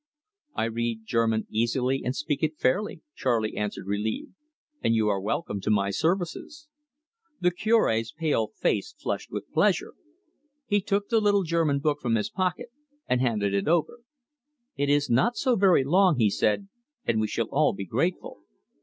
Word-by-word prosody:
"I - - 0
read 115 0 -2
German 115 -1 +1
easily 125 +4 0
and 125 +2 -2
speak 150 -1 -2
it 155 -1 -1
fairly," 185 +5 0
Charley 115 -4 0
answered, 105 -2 -3
relieved; 105 +2 -3 0.5
"and 115 - +3
you 110 -1 +2
are 100 -2 0
welcome 105 - -2
to 100 - -2
my 100 -2 +2
services." 175 - -2 0.7
The 180 0 +2
Cure's 175 - +1
pale 150 -9 0
face 440 - -2
flushed - - -3
with - - -6
pleasure. - - +1 0.7
He 205 -4 +1
took 200 +1 -1
the 225 -2 +3
little 205 -1 +3
German 165 -4 +1
book 150 -1 0
from 120 -2 +1
his 105 - -1
pocket, 185 +5 -2 0.4
and 125 0 +1
handed 105 -5 0
it 100 +5 0
over. 170 +8 +1 0.8
"It 145 - 0
is 145 0 +3
not 135 - +2
so 255 -2 +2
very 190 -8 +4
long," 180 +2 +4
he 110 -4 +3
said; 155 - 0 0.4
"and 110 -2 +1
we 110 - 0
shall 115 +1 -2
all 150 +2 +3
be 100 0 -6
grateful." 165 - -2
135 Hz, 165 wpm, -26 LUFS, 110-180 Hz, 0.8 s, very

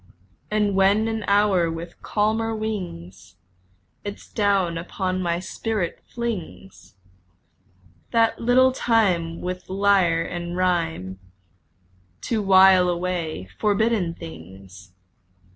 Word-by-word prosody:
And 210 -1 +1
when 195 +3 +3
an 225 -1 -3
hour 200 -4 +3
with 165 +1 -7
calmer 220 +2 0
wings 100 - -6 0.7
Its 205 0 -7
down 200 -5 +1
upon 185 +2 -3
my 170 -1 -1
spirit 190 0 -3
flings 170 - -6 1.1
That 230 -1 +2
little 255 +2 +4
time 185 -10 +1
with 180 0 -5
lyre 190 -4 +2
and 175 0 -5
rhyme 165 - -1 1.0
To 225 -3 -1
while 190 -2 +6
away 170 - -3
forbidden 210 -4 +1
things! 90 - -12
185 Hz, 95 wpm, -23 LUFS, 165-210 Hz, 1.1 s, while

